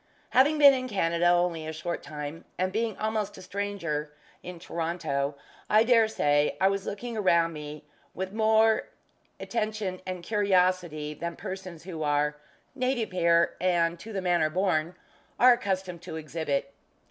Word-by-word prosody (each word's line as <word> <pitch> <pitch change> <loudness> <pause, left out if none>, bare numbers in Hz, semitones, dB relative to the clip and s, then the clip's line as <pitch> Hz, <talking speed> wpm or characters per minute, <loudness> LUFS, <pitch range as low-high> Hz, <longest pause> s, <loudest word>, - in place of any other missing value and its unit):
Having 290 +4 +4
been 285 -2 +8
in 255 -1 -2
Canada 170 -4 +1
only 175 -2 +2
a - - -3
short 170 +2 -4
time, 150 +1 -7
and 185 +1 -1
being 220 -1 -1
almost 215 -2 -2
a - - -10
stranger 180 -7 -3 0.3
in 180 -1 -8
Toronto, 160 -5 -2 0.3
I 215 +1 +5
dare 230 -2 +5
say 145 -8 +1
I 190 - +4
was 195 0 -3
looking 235 +3 -5
around 170 -5 +2
me 150 0 -8 0.3
with 190 +1 -4
more 220 0 +3 0.5
attention 215 -5 -3
and 185 -2 -5
curiosity 180 -7 +1
than 170 +2 -5
persons 185 -4 -7
who 170 -3 -7
are 150 0 +1 0.4
"native 255 -4 -1
here, 170 -2 +3
and 170 -2 +1
to 225 - -9
the 195 -2 -3
manner 175 -4 +2
born," 175 -1 0 0.4
are 250 0 +8
accustomed 190 -7 -3
to 180 -2 -7
exhibit. 150 -3 -3
180 Hz, 150 wpm, -28 LUFS, 160-210 Hz, 0.5 s, been